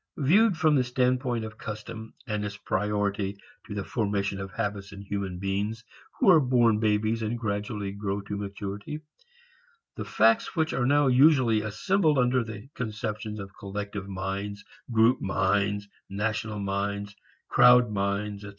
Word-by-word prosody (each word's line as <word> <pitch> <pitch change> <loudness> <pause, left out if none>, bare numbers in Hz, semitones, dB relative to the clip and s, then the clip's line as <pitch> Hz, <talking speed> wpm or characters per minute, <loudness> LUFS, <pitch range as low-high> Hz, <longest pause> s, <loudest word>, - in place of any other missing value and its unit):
Viewed 190 +7 +4
from 155 -1 +3
the 135 -3 +4
standpoint 125 -1 0
of 110 0 -10
custom 110 +1 -7
and 105 -4 -2
its 105 0 -5
priority 100 -1 -1 0.3
to 105 - -6
the 100 - -2
formation 100 -3 -1
of 95 0 -5
habits 100 -2 -4
in 100 0 -9
human 100 -2 -4
beings 100 +4 -2 0.3
who 250 - +1
are 165 - +7
born 120 -5 +3
babies 110 +1 +1
and 110 +2 -2
gradually 105 -2 -3
grow 100 0 -3
to 100 +1 -5
maturity, 100 +7 -5 0.9
the - - -4
facts 115 +1 +2
which 160 -1 +1
are 125 -2 +1
now 145 +1 +4
usually 130 -4 +5
assembled 155 - +1
under 125 0 +3
the 110 +1 -8
conceptions 110 -1 -4
of 95 -1 -9
collective 100 0 -6
minds, 100 +2 -4 0.3
group 115 +2 +4
minds, 100 +1 0 0.2
national 105 +1 -2
minds, 100 +1 -3 0.3
crowd 125 -2 +6
minds, 100 0 -2
etc. 100 - -7
105 Hz, 150 wpm, -27 LUFS, 100-120 Hz, 0.9 s, are